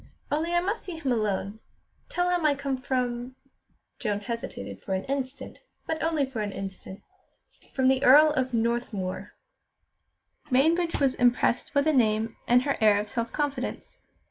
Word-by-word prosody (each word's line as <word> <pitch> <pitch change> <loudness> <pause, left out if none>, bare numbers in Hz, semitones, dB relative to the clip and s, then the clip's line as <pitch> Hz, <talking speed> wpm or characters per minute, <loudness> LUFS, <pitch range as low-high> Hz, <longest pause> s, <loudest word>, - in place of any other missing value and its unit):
Only 315 +3 0
I 345 - +4
must 405 +5 -2
see 360 -4 -7
him 280 -5 -2
alone. 210 -2 -1 0.5
Tell 355 0 0
him 355 -2 +1
I 300 -2 +3
come 280 -1 -2
from" 250 -1 -2 0.6
Joan 205 -3 -1
hesitated 200 - -6
for 190 - -2
an 190 - -2
instant, 270 0 -4 0.3
but 320 - -3
only 320 -3 +1
for 260 -4 -6
an 205 -1 -2
instant 195 0 -8 0.7
"from 260 -1 +3
the 265 +1 +3
Earl 300 +4 +8
of 260 -3 -1
Northmuir." 230 -5 -2 1.1
Mainbridge 330 +6 +2
was 275 -3 +3
impressed 245 0 +2
by 285 - +5
the 310 +2 +2
name 225 -3 +2
and 245 +1 +5
her 280 0 0
air 210 -2 +5
of 210 0 -4
self 230 +1 -3
confidence. 285 -4 -3
255 Hz, 160 wpm, -27 LUFS, 220-290 Hz, 1.1 s, Earl